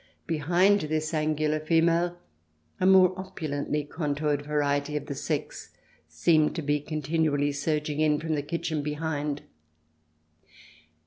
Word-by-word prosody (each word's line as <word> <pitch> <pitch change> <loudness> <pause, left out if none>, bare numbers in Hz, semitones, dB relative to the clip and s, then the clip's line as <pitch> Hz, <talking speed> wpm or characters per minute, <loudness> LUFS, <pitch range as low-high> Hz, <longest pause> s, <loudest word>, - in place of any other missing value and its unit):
Behind 175 +6 +3
this 155 +1 -2
angular 155 0 0
female, 170 +2 +2 0.6
a 185 - +3
more 185 -1 +6
opulently 150 -6 -3
con 145 0 -3
toured 145 -1 0
variety 145 0 0
of 145 - -5
the 145 - -4
sex 145 +2 -4 0.4
seemed 150 - +2
to 165 - -3
be 145 +1 +1
continually 150 -1 0
surging 150 +1 -2
in 150 -1 +3
from 160 0 -2
the 145 - 0
kitchen 160 0 -3
behind. 150 -1 -3
150 Hz, 125 wpm, -27 LUFS, 145-165 Hz, 0.6 s, more